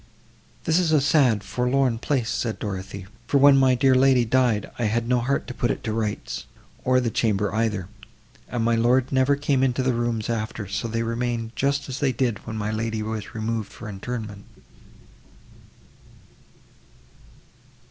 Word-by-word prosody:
"This 160 Hz, +2 st, +2 dB
is 170 Hz, -3 st, +1 dB
a 155 Hz, -, +5 dB
sad 130 Hz, -7 st, +3 dB
forlorn 125 Hz, -1 st, 0 dB
place!" 125 Hz, -3 st, -1 dB
said 115 Hz, -3 st, -2 dB
Dorothée, 100 Hz, -1 st, -5 dB, 0.2 s
"for, 140 Hz, -, +3 dB
when 140 Hz, 0 st, +7 dB
my 130 Hz, -1 st, +4 dB
dear 130 Hz, +1 st, +4 dB
lady 130 Hz, -1 st, +4 dB
died, 120 Hz, -3 st, +1 dB
I 120 Hz, -, +1 dB
had 115 Hz, +2 st, 0 dB
no 125 Hz, 0 st, +2 dB
heart 135 Hz, +4 st, -1 dB
to 125 Hz, -, -7 dB
put 120 Hz, -1 st, -1 dB
it -, -, -2 dB
to 110 Hz, -, -2 dB
rights, 110 Hz, -2 st, -3 dB, 0.4 s
or 130 Hz, 0 st, +3 dB
the 120 Hz, -2 st, -1 dB
chamber 105 Hz, -2 st, 0 dB
either; 110 Hz, -5 st, -1 dB, 0.6 s
and 120 Hz, -2 st, -1 dB
my 115 Hz, -, +3 dB
lord 120 Hz, +3 st, +2 dB
never 135 Hz, +1 st, +3 dB
came 140 Hz, -2 st, 0 dB
into 130 Hz, 0 st, +1 dB
the 130 Hz, 0 st, +1 dB
rooms 115 Hz, -2 st, -1 dB
after, 110 Hz, -2 st, -3 dB
so 100 Hz, +4 st, -3 dB
they 115 Hz, 0 st, -2 dB
remain 115 Hz, 0 st, -2 dB
just 140 Hz, +4 st, 0 dB
as 130 Hz, 0 st, -5 dB
they 140 Hz, -3 st, +2 dB
did 120 Hz, -3 st, -2 dB
when 110 Hz, 0 st, -4 dB
my 105 Hz, 0 st, -2 dB
lady 110 Hz, 0 st, -2 dB
was 110 Hz, -1 st, -5 dB
removed 110 Hz, -1 st, -3 dB
for -, -, -10 dB
interment." 105 Hz, 0 st, -6 dB
120 Hz, 170 wpm, -24 LUFS, 110-130 Hz, 0.6 s, when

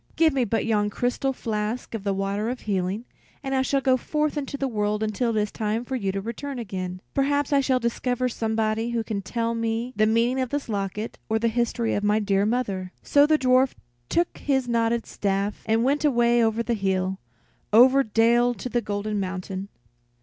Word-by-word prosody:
Give 320 Hz, -2 st, +4 dB
me 260 Hz, -3 st, +1 dB
but 225 Hz, +1 st, 0 dB
yon 210 Hz, -2 st, +1 dB
crystal 245 Hz, +5 st, -1 dB
flask 220 Hz, -1 st, -3 dB
of 220 Hz, -3 st, -4 dB
the 200 Hz, -, 0 dB
water 195 Hz, +3 st, -1 dB
of 250 Hz, 0 st, -4 dB
healing, 195 Hz, +2 st, -2 dB, 0.4 s
and 270 Hz, -1 st, -2 dB
I 265 Hz, -, +3 dB
shall 275 Hz, +1 st, +1 dB
go 260 Hz, -1 st, +3 dB
forth 300 Hz, +4 st, -1 dB
into 280 Hz, -1 st, -3 dB
the 275 Hz, -, -1 dB
world 210 Hz, -2 st, -1 dB
until 220 Hz, +3 st, 0 dB
it 220 Hz, -2 st, +1 dB
is 210 Hz, -1 st, -1 dB
time 220 Hz, +2 st, -2 dB
for 265 Hz, -, -3 dB
you 200 Hz, -6 st, -1 dB
to 195 Hz, -, -3 dB
return 240 Hz, +6 st, -5 dB
again. 185 Hz, -5 st, -5 dB
Perhaps 285 Hz, +1 st, +1 dB
I 280 Hz, -, +5 dB
shall 260 Hz, -1 st, +2 dB
discover 245 Hz, +1 st, -1 dB
somebody 225 Hz, -1 st, -1 dB
who 235 Hz, -1 st, -1 dB
can 215 Hz, -3 st, -3 dB
tell 230 Hz, +4 st, -2 dB
me 230 Hz, +2 st, -2 dB
the 215 Hz, +1 st, +3 dB
meaning 235 Hz, +4 st, +2 dB
of 255 Hz, -, -2 dB
this 285 Hz, +1 st, -3 dB
locket, 205 Hz, +1 st, -3 dB
or 220 Hz, -, +2 dB
the 230 Hz, +1 st, +1 dB
history 235 Hz, 0 st, 0 dB
of 205 Hz, -, -1 dB
my 210 Hz, +1 st, +3 dB
dear 200 Hz, -1 st, +1 dB
mother." 200 Hz, -6 st, -1 dB
So 285 Hz, 0 st, +5 dB
the 310 Hz, 0 st, +4 dB
dwarf 255 Hz, -1 st, +3 dB, 0.3 s
took 345 Hz, 0 st, 0 dB
his 265 Hz, -3 st, 0 dB
knotted 230 Hz, -1 st, +1 dB
staff, 200 Hz, +1 st, -2 dB
and 225 Hz, +1 st, +2 dB
went 280 Hz, +4 st, +1 dB
away 240 Hz, -4 st, +3 dB
over 225 Hz, +1 st, +1 dB
hill, 190 Hz, -2 st, -1 dB, 0.5 s
over 255 Hz, +5 st, +7 dB
dale 235 Hz, +1 st, +3 dB
to 250 Hz, -, -6 dB
the 240 Hz, 0 st, 0 dB
Golden 210 Hz, 0 st, -2 dB
Mountain. 190 Hz, +1 st, -4 dB
230 Hz, 200 wpm, -25 LUFS, 210-255 Hz, 0.5 s, over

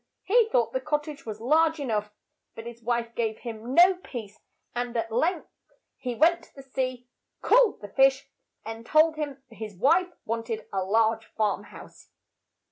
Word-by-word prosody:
He 450 Hz, +2 st, +4 dB
thought 240 Hz, -, +1 dB
the 260 Hz, -, -1 dB
cot 295 Hz, +1 st, 0 dB
tage 295 Hz, -5 st, -10 dB
was 215 Hz, -1 st, -5 dB
large 315 Hz, +6 st, +3 dB
e 285 Hz, -, -3 dB
nough, 210 Hz, -3 st, -1 dB, 0.4 s
but 225 Hz, -, -8 dB
his 235 Hz, 0 st, -9 dB
wife 235 Hz, 0 st, -1 dB
gave 220 Hz, -2 st, -1 dB
him 235 Hz, +2 st, -6 dB
no 360 Hz, +2 st, +8 dB
peace, 235 Hz, -, -9 dB, 0.3 s
and 245 Hz, 0 st, -3 dB
at 225 Hz, 0 st, -2 dB
length 320 Hz, +9 st, 0 dB, 0.4 s
he 250 Hz, -2 st, -4 dB
went 340 Hz, +6 st, +4 dB
to -, -, -27 dB
the 275 Hz, -, -11 dB
sea, 255 Hz, -2 st, -3 dB, 0.4 s
called -, -, +4 dB
the 205 Hz, -, -7 dB
fish, 270 Hz, +4 st, +3 dB, 0.4 s
and 225 Hz, 0 st, -7 dB
told 310 Hz, +5 st, +4 dB
him 285 Hz, -3 st, -5 dB
his 215 Hz, -3 st, -8 dB
wife 340 Hz, -, +3 dB
want 230 Hz, +1 st, -3 dB
ed 220 Hz, -1 st, -3 dB
a 190 Hz, -1 st, 0 dB
large 225 Hz, +3 st, +1 dB
farm 215 Hz, -2 st, 0 dB
house. -, -, -14 dB
245 Hz, 180 wpm, -27 LUFS, 225-300 Hz, 0.4 s, no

